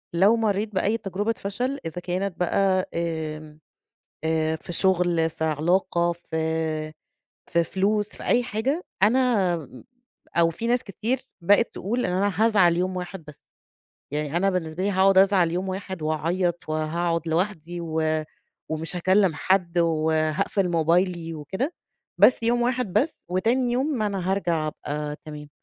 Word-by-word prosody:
لو 200 Hz, +6 st, +5 dB
مرّيت 215 Hz, -1 st, 0 dB
بأي 205 Hz, +4 st, +1 dB
تجربة 205 Hz, +2 st, -2 dB
فشل 250 Hz, +8 st, -3 dB
إذا 165 Hz, +2 st, -5 dB
كانت 180 Hz, +1 st, -3 dB
بقى 185 Hz, +1 st, +1 dB
آآ 155 Hz, -2 st, -4 dB, 0.7 s
آآ 160 Hz, 0 st, +1 dB
في 175 Hz, -, -9 dB
شغل، 175 Hz, -3 st, +2 dB
في 160 Hz, -, -4 dB
علاقة 170 Hz, +3 st, +1 dB
في 160 Hz, -2 st, -3 dB, 0.6 s
في 170 Hz, 0 st, +3 dB
فلوس، 205 Hz, +4 st, 0 dB
في -, -, -11 dB
أي 245 Hz, 0 st, +3 dB
حاجة، 255 Hz, -, -2 dB, 0.2 s
أنا 220 Hz, -6 st, +3 dB, 0.8 s
أو 165 Hz, -1 st, +5 dB
في 225 Hz, +8 st, -4 dB
ناس 245 Hz, 0 st, +2 dB
كتير 220 Hz, +7 st, -2 dB, 0.2 s
بقت 205 Hz, +6 st, +3 dB
تقول 240 Hz, +6 st, -2 dB
إن 180 Hz, -, -1 dB
أنا 195 Hz, +2 st, +1 dB
هازعل 200 Hz, -6 st, +4 dB
يوم 185 Hz, +1 st, -1 dB
واحد 180 Hz, -1 st, -6 dB
بس، 150 Hz, -, -12 dB, 0.7 s
يعني 150 Hz, +2 st, -1 dB
أنا 195 Hz, +2 st, +2 dB
بالنسبة 180 Hz, -1 st, -2 dB
لي 200 Hz, -, +1 dB
هاقعد 190 Hz, 0 st, +4 dB
أزعل 190 Hz, -3 st, +5 dB
يوم 185 Hz, +2 st, -2 dB
واحد 190 Hz, -2 st, -5 dB
وأعيّط 165 Hz, +3 st, -1 dB
وهاقعد 165 Hz, +2 st, -1 dB
لوحدي 175 Hz, 0 st, -2 dB
و 155 Hz, -1 st, 0 dB, 0.5 s
ومش 160 Hz, +2 st, -3 dB
هاكلّم 185 Hz, 0 st, +3 dB
حد 175 Hz, +1 st, +1 dB
وهاقفل 160 Hz, +3 st, +1 dB
موبايلي 170 Hz, 0 st, +1 dB
وكده، 190 Hz, -, -3 dB, 0.4 s
بس 245 Hz, -, +5 dB
يوم 240 Hz, +1 st, +2 dB
واحد 245 Hz, -5 st, 0 dB
بس، 310 Hz, +4 st, +1 dB
وتاني 235 Hz, +8 st, +1 dB
يوم 260 Hz, 0 st, 0 dB
أنا 195 Hz, -3 st, -1 dB
هارجع 170 Hz, -5 st, 0 dB
أبقى 150 Hz, 0 st, -4 dB
تمام. 150 Hz, -1 st, -9 dB
180 Hz, 145 wpm, -25 LUFS, 160-200 Hz, 0.8 s, لو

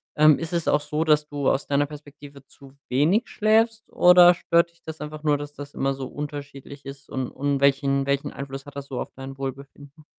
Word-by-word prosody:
Ähm, 155 Hz, -1 st, +6 dB
ist 165 Hz, +1 st, -5 dB
es 170 Hz, -2 st, -1 dB
auch 145 Hz, -, +3 dB
so, 150 Hz, +2 st, -2 dB
dass 150 Hz, -1 st, +3 dB
du 145 Hz, -2 st, -1 dB
aus 135 Hz, -, 0 dB
deiner 145 Hz, +1 st, +2 dB
Perspektive 145 Hz, -2 st, -13 dB
zu 135 Hz, -1 st, -17 dB, 0.2 s
wenig 165 Hz, -, +2 dB
schläfst, 220 Hz, +1 st, +1 dB
oder 180 Hz, 0 st, +7 dB
stört 170 Hz, 0 st, +2 dB
dich 170 Hz, -, -31 dB
das 160 Hz, -1 st, -8 dB
einfach 150 Hz, 0 st, -7 dB
nur, 150 Hz, -2 st, +2 dB
dass 145 Hz, 0 st, -8 dB
das 145 Hz, 0 st, -10 dB
immer 135 Hz, 0 st, 0 dB
so 135 Hz, -1 st, -6 dB
unterschiedlich 145 Hz, -1 st, -8 dB
ist, 135 Hz, 0 st, -10 dB
und 130 Hz, -2 st, -3 dB
und 140 Hz, 0 st, -1 dB
welchen 140 Hz, 0 st, +2 dB
welchen 140 Hz, 0 st, -1 dB
Einfluss 135 Hz, 0 st, -7 dB
hat 145 Hz, -, -12 dB
das 140 Hz, -, -6 dB
so 130 Hz, -3 st, -5 dB
auf -, -, -6 dB
dein 135 Hz, 0 st, -8 dB
Wohlbefinden? 140 Hz, +2 st, -8 dB
145 Hz, 210 wpm, -24 LUFS, 140-155 Hz, 0.2 s, oder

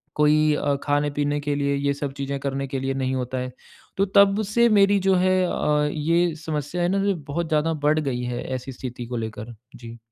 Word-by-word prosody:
कोई 150 Hz, 0 st, +4 dB
अ, 145 Hz, -1 st, 0 dB
खाने-पीने 145 Hz, 0 st, 0 dB
के 145 Hz, 0 st, -1 dB
लिए 140 Hz, 0 st, 0 dB
ये 140 Hz, 0 st, 0 dB
सब 140 Hz, 0 st, -4 dB
चीज़ें 140 Hz, 0 st, -3 dB
करने 135 Hz, 0 st, -3 dB
के 135 Hz, 0 st, -3 dB
लिए 135 Hz, +1 st, -2 dB
नहीं 130 Hz, -1 st, -1 dB
होता 130 Hz, 0 st, -3 dB
है। 125 Hz, 0 st, -4 dB, 0.5 s
तो 195 Hz, -, +3 dB
तब 200 Hz, +1 st, +5 dB
से 235 Hz, +1 st, +5 dB
मेरी 200 Hz, -1 st, +4 dB
जो 190 Hz, -, +5 dB
है 185 Hz, 0 st, +3 dB
अ, 150 Hz, -3 st, +1 dB
ये 165 Hz, +2 st, +1 dB
समस्या 155 Hz, +2 st, -3 dB
है 175 Hz, -, +2 dB
ना 195 Hz, +1 st, +1 dB
जो, 200 Hz, -1 st, +2 dB
बहुत 160 Hz, +2 st, -4 dB
ज़्यादा 155 Hz, +1 st, +1 dB
बढ़ 155 Hz, +1 st, +3 dB
गई 135 Hz, -5 st, -2 dB
है 120 Hz, 0 st, -3 dB
ऐसी 130 Hz, +1 st, -6 dB
स्थिति 125 Hz, -1 st, -7 dB
को 120 Hz, 0 st, -4 dB
लेकर। 110 Hz, +1 st, -8 dB, 0.2 s
जी। 115 Hz, -1 st, -10 dB
145 Hz, 215 wpm, -23 LUFS, 135-165 Hz, 0.5 s, तब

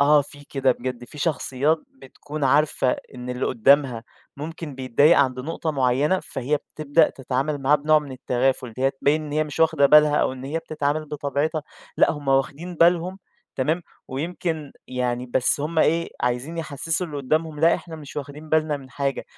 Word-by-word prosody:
آه 145 Hz, +1 st, +6 dB
في 145 Hz, +1 st, -14 dB
كده 135 Hz, -2 st, +1 dB
بجد، 125 Hz, -1 st, -5 dB
في 150 Hz, -, -13 dB
شخصيات 150 Hz, 0 st, +1 dB, 0.2 s
بتكون 145 Hz, +2 st, -6 dB
عارفة 140 Hz, -2 st, +2 dB, 0.2 s
إن 125 Hz, 0 st, -6 dB
اللي 125 Hz, +1 st, -2 dB
قدَّامها 125 Hz, -1 st, +3 dB, 0.3 s
ممكن 155 Hz, 0 st, -6 dB
بيتضايق 135 Hz, +5 st, +4 dB
عند 130 Hz, -2 st, +2 dB
نقطة 160 Hz, +2 st, -3 dB
معيّنة، 140 Hz, +6 st, +2 dB
فهي 135 Hz, +2 st, -2 dB
بتبدأ 155 Hz, +2 st, +1 dB
تتعامل 135 Hz, +3 st, -2 dB
معاه 145 Hz, +3 st, +5 dB
بنوع 155 Hz, +1 st, +4 dB
من 145 Hz, -3 st, -8 dB
التغافُل، 130 Hz, 0 st, 0 dB
إن 110 Hz, -, -13 dB
هي 135 Hz, +1 st, +3 dB
تبيّن 145 Hz, +3 st, 0 dB
إن 145 Hz, -, -7 dB
هي 155 Hz, +1 st, +1 dB
مش 150 Hz, +1 st, -6 dB
واخدة 140 Hz, -3 st, +5 dB
بالها، 150 Hz, 0 st, +6 dB
أو -, -, +2 dB
إن 130 Hz, 0 st, -8 dB
هي 150 Hz, +4 st, -2 dB
بتتعامل 155 Hz, -1 st, -2 dB
بطبيعتها، 150 Hz, +1 st, -2 dB, 0.3 s
لأ -, -, +5 dB
هُم 145 Hz, -3 st, -7 dB
واخدين 140 Hz, +6 st, 0 dB
بالهم، 175 Hz, +3 st, +3 dB, 0.4 s
تمام، 155 Hz, +6 st, 0 dB, 0.3 s
ويمكن 155 Hz, +1 st, -3 dB
يعني 125 Hz, -1 st, -2 dB
بس 125 Hz, +3 st, +1 dB
هُم 160 Hz, +2 st, -2 dB
إيه، 165 Hz, +2 st, +2 dB
عايزين 125 Hz, +7 st, -2 dB
يحسسوا 165 Hz, +3 st, -2 dB
اللي 150 Hz, -2 st, -7 dB
قدّامهم 155 Hz, +2 st, -1 dB
لأ 165 Hz, +1 st, +5 dB
إحنا 165 Hz, -2 st, -7 dB
مش 150 Hz, -2 st, -11 dB
واخدين 145 Hz, +2 st, -7 dB
بالنا 155 Hz, -1 st, +2 dB
من 135 Hz, -2 st, -13 dB
حاجة. 140 Hz, -1 st, -2 dB
145 Hz, 175 wpm, -23 LUFS, 130-155 Hz, 0.4 s, آه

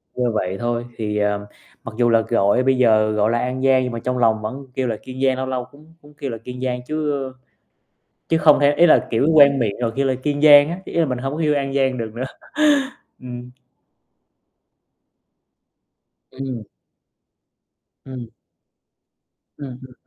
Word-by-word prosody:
như 125 Hz, -2 st, 0 dB
vậy 95 Hz, -2 st, -2 dB
thôi. 120 Hz, 0 st, -2 dB
Thì, 105 Hz, -1 st, -3 dB
ờ, 105 Hz, 0 st, -1 dB, 0.4 s
mặc 115 Hz, -, -8 dB
dù 120 Hz, -1 st, +3 dB
là 115 Hz, -1 st, +4 dB
gọi 100 Hz, +3 st, +1 dB
bây 130 Hz, 0 st, +2 dB
giờ 110 Hz, -3 st, +3 dB
gọi 105 Hz, 0 st, +1 dB
là 120 Hz, -, +1 dB
An 130 Hz, +1 st, -3 dB
Giang, 130 Hz, -1 st, +4 dB
nhưng 125 Hz, -, -3 dB
mà 115 Hz, -, -5 dB
trong 125 Hz, +2 st, -3 dB
lòng 110 Hz, -2 st, +2 dB
vẫn 130 Hz, +6 st, -6 dB
kêu 130 Hz, -2 st, -1 dB
là 115 Hz, -2 st, -2 dB
Kiên 130 Hz, +1 st, -8 dB
Giang, 130 Hz, -1 st, +2 dB
lâu 130 Hz, -, -2 dB
lâu 130 Hz, -1 st, -3 dB
cũng 155 Hz, +3 st, -19 dB
cũng 145 Hz, 0 st, -18 dB
kêu 135 Hz, -4 st, -5 dB
là 115 Hz, -, -5 dB
Kiên 125 Hz, +3 st, -9 dB
Giang 125 Hz, -1 st, -2 dB
chứ, 155 Hz, -1 st, -2 dB
ơ, 130 Hz, -1 st, -8 dB, 1.0 s
chứ 165 Hz, -, +2 dB
không 150 Hz, -2 st, +5 dB
thể 145 Hz, 0 st, +4 dB
ý 170 Hz, +4 st, +5 dB
là, 160 Hz, -, +4 dB
kiểu, 115 Hz, +4 st, +1 dB
quen 140 Hz, -2 st, +6 dB
miệng 110 Hz, -5 st, -1 dB
rồi 115 Hz, -2 st, -1 dB
kêu 135 Hz, 0 st, +1 dB
là 130 Hz, -, +1 dB
Kiên 145 Hz, +1 st, -2 dB
Giang 145 Hz, -1 st, +8 dB
á, 175 Hz, -, -5 dB
ý -, -, -9 dB
là 170 Hz, -, +3 dB
mình 125 Hz, -2 st, -3 dB
hông 135 Hz, +2 st, -4 dB
có -, -, -6 dB
yêu 150 Hz, -2 st, +2 dB
An 135 Hz, -1 st, -2 dB
Giang 130 Hz, -2 st, +1 dB
được 115 Hz, -2 st, -4 dB
nữa. 125 Hz, +2 st, -4 dB, 1.0 s
Ừm. 125 Hz, 0 st, -9 dB, 2.8 s
Ừm. 130 Hz, -4 st, -6 dB, 1.4 s
Ừm. 130 Hz, -3 st, -8 dB, 1.3 s
Ừm 130 Hz, -4 st, -8 dB
hưm 130 Hz, -1 st, -13 dB
130 Hz, 190 wpm, -20 LUFS, 115-140 Hz, 2.8 s, Giang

